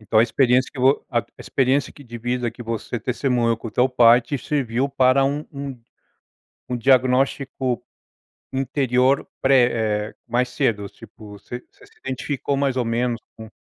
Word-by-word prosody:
Então 110 +1 +1
a - - +7
experiência 125 +2 +2
que 135 - -11
vo 135 +2 +3
a 120 -2 +2
a - - -17
experiência 135 +1 0
que 145 - -15
divisa 120 0 -3
que 120 +1 -10
você 115 +1 -4
testemunhou 120 -1 0
com 115 - -7
o - - -9
teu 125 +4 +2
pai 120 -1 +6
te 125 +4 -4
serviu 130 -1 -1
para 135 0 +3
um 145 +2 -2 1.2
um 125 - -2
diagnóstico 130 0 +1 0.7
interior 130 0 +1
pré, 115 -5 +2
eh, - - -22
mais 125 +1 0
cedo 115 -6 -1
tipo 105 +1 -14
você 120 +4 -9
se - - -21
identificou 135 +2 -3
mais 135 -2 0
ou 125 - +1
menos 120 +1 -1 0.2
com 110 0 -10
125 Hz, 160 wpm, -22 LUFS, 115-135 Hz, 1.2 s, a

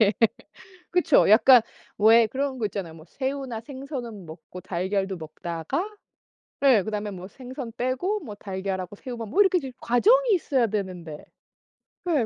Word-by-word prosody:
예. 210 -1 +5 0.8
그쵸 340 - +4
약간 245 +2 +8 0.4
왜 225 +2 +6
그런 265 +3 -3
거 220 - 0
있잖아요. 185 -5 -6
뭐 160 -1 -13
새우나 265 -3 -4
생선은 250 - -7
먹고 165 +3 -10
달걀도 190 +2 -2
먹다가 165 - -4 0.7
네 260 -7 +5
그다음에 210 0 -3
뭐 185 -1 -8
생선 255 +1 -8
빼고 270 - -1
뭐 225 -9 -8
달걀하고 190 -1 -4
새우만 235 -1 -7
뭐 395 - +3
이렇게 380 -2 +4
좀 270 -3 -7
과정이 455 - +4
있어야 275 -9 +2
되는데. 180 -7 -5 0.9
예. 285 -8 +2
225 Hz, 300 characters per minute, -25 LUFS, 190-270 Hz, 0.9 s, 약간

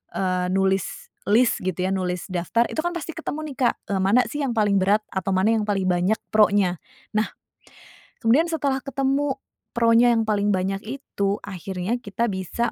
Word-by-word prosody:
eee, 185 -1 0
nulis 195 -1 0 0.2
lis, 235 +3 +4
gitu, 185 -2 -2
ya, - - -1
nulis 180 -2 -2
daftar, 180 +6 +1
itu, - - -4
kan, 345 +1 -1
pasti 330 -1 -4
ketemu, 310 -2 -4
nih, - - -23
Kak, - - -3 0.2
eee, 195 - +1
mana, 210 +6 +5
sih, 295 - -5
yang 250 -3 -1
paling 205 -2 +3
berat 205 +3 +3
atau 190 0 -1
mana 205 +5 +3
yang 215 -1 -1
paling 195 -2 0
banyak 180 +4 +2
pronya. 205 -5 +3 0.4
Nah, 215 +1 +2 1.0
kemudian 275 +9 +4
setelah 280 -4 0
ketemu 275 0 0 0.4
pronya 235 +1 +5
yang 225 - +2
paling 210 -1 +1
banyak 195 +1 -1
itu, 205 -5 -2
akhirnya 190 +2 -3
kita 220 +1 -2
bisa 195 +4 -2
205 Hz, 175 wpm, -23 LUFS, 190-240 Hz, 1.0 s, mana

